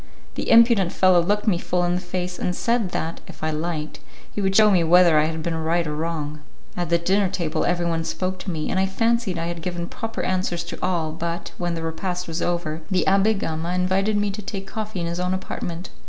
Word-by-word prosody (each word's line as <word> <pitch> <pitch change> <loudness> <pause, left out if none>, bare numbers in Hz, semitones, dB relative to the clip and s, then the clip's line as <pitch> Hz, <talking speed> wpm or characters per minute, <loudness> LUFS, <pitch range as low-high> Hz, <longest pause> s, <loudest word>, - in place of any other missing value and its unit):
The - - -4
impudent 230 -6 +6
fellow 185 -2 +5
looked 205 +4 0
me 190 -6 +2
full 180 0 0
in 175 0 +1
the 180 - -1
face, 180 0 -4
and 180 - -1
said 230 -3 +1
that, 165 -1 -3
if - - -11
I 155 - +1
liked, 155 -1 -3 0.3
he 205 - -2
would 195 0 +1
shew 215 0 +7
me 180 -3 +4
whether 170 -1 +6
I 150 - +3
had 160 0 -3
been 170 - -1
right 165 +1 0
or 150 0 -3
wrong. 155 -1 -3 0.4
At 175 -2 -2
the 170 - +4
dinner 190 +3 +2
table 175 -4 -1
everyone 170 -2 0
spoke 185 +2 -3
to 190 - -5
me, 155 -3 -2
and 190 - +1
I 190 - +2
fancied 225 -1 +1
I 165 - -2
had 170 0 -4
given 175 -1 -3
proper 225 +4 -5
answers 185 -2 -1
to 170 - -7
all, 170 -4 0
but, 170 +2 -4
when 175 -1 -1
the 165 - -4
repast 180 +2 -3
was 165 +1 -3
over, 170 -2 -1
the 185 -2 +2
Abbé 200 +2 +4
Gama 165 -1 -2
invited 190 +3 +1
me 205 0 +1
to 210 +2 -6
take 195 -1 -5
coffee 215 -2 -4
in - - -1
his 170 +1 -3
own 180 +1 0
apartment. 175 -1 -5
175 Hz, 230 wpm, -23 LUFS, 165-190 Hz, 0.4 s, shew